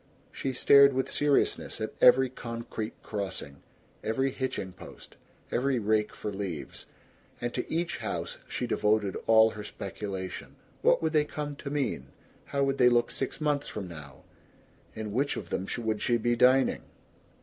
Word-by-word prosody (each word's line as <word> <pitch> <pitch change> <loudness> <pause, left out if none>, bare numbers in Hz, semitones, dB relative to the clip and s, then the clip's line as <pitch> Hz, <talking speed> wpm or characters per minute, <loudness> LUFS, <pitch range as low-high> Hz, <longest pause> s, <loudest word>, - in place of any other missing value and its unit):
She 135 - -3
stared 140 +2 +6
with 130 0 -1
seriousness 145 -1 +1
at - - -3
every 130 +1 +7
concrete 115 -3 -6
crossing, 95 -9 -5 0.4
every 135 +5 0
hitching 130 -8 -3
post, - - -13 0.4
every 130 +1 +1
rake 110 -1 +1
for 105 - -5
leaves; 95 -6 -5 0.5
and 120 0 -3
to - - -4
each 170 +2 -1
house - - -4
she 125 - -3
devoted 105 -4 +1
all 110 0 +6
her 105 - -7
speculation. 95 -2 -6 0.3
What - - +4
would 160 0 0
they 150 -1 +4
come 150 -1 -5
to 140 - -6
mean? 140 - -2 0.4
How 140 -1 0
would 135 0 0
they 125 -1 +7
look 120 -1 +2
six 135 - -3
months 145 -2 0
from 100 -3 -5
now? 75 -5 -11 0.7
In 110 -1 -5
which 140 +5 0
of 85 - -7
them 95 - -2 0.2
would 110 -1 -1
she 120 - +2
be 120 +1 +1
dining? 130 +2 +4
120 Hz, 160 wpm, -29 LUFS, 105-135 Hz, 0.7 s, every